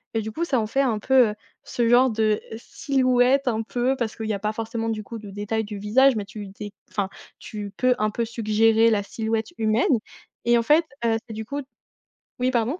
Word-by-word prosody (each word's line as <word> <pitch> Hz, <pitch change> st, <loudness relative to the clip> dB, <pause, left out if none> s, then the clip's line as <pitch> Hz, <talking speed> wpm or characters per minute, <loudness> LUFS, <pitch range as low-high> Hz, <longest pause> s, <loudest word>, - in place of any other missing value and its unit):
et 225 Hz, -, +1 dB
du 220 Hz, +1 st, -5 dB
coup, 335 Hz, -, -3 dB
ça 265 Hz, -8 st, +1 dB
en 215 Hz, -, 0 dB
fait 270 Hz, +6 st, 0 dB
un 240 Hz, -5 st, +1 dB
peu, 250 Hz, +1 st, +4 dB
heu, 210 Hz, -, -5 dB, 0.3 s
ce 235 Hz, -1 st, -1 dB
genre 250 Hz, +2 st, +5 dB
de, 215 Hz, -1 st, +1 dB
heu, 220 Hz, -, -5 dB
silhouette 255 Hz, +1 st, +1 dB
un 225 Hz, -2 st, +1 dB
peu, 245 Hz, +4 st, 0 dB
parce 235 Hz, -4 st, -3 dB
qu'il 220 Hz, -, -5 dB
y 215 Hz, -, 0 dB
a 200 Hz, -, -3 dB
pas 210 Hz, +1 st, -2 dB
forcément, 225 Hz, 0 st, -3 dB
du 215 Hz, -1 st, -3 dB
coup, 230 Hz, +2 st, -8 dB
de 210 Hz, -2 st, -10 dB
détails 210 Hz, +3 st, -2 dB
du 205 Hz, -1 st, -7 dB
visage, 245 Hz, +6 st, +4 dB
mais 210 Hz, -, -3 dB
tu 205 Hz, 0 st, -8 dB
dé 200 Hz, +1 st, -8 dB, 0.2 s
enfin, 195 Hz, -2 st, -2 dB, 0.3 s
tu 205 Hz, -2 st, -7 dB
peux, 255 Hz, 0 st, +3 dB
un 215 Hz, 0 st, +2 dB
peu, 230 Hz, +2 st, -2 dB
suggérer 225 Hz, 0 st, +3 dB
la 205 Hz, -2 st, +1 dB
silhouette 220 Hz, -, -2 dB
humaine 220 Hz, +2 st, +2 dB, 0.5 s
et, 240 Hz, 0 st, +5 dB
en 230 Hz, -, +1 dB
fait, 310 Hz, +7 st, +4 dB, 0.2 s
heu, 225 Hz, -1 st, +2 dB
c'est, 220 Hz, -, -7 dB
du 220 Hz, 0 st, -5 dB
coup 285 Hz, +4 st, -4 dB, 0.8 s
Oui, 255 Hz, +1 st, +1 dB
pardon? 245 Hz, +8 st, 0 dB
225 Hz, 230 wpm, -24 LUFS, 215-245 Hz, 0.8 s, genre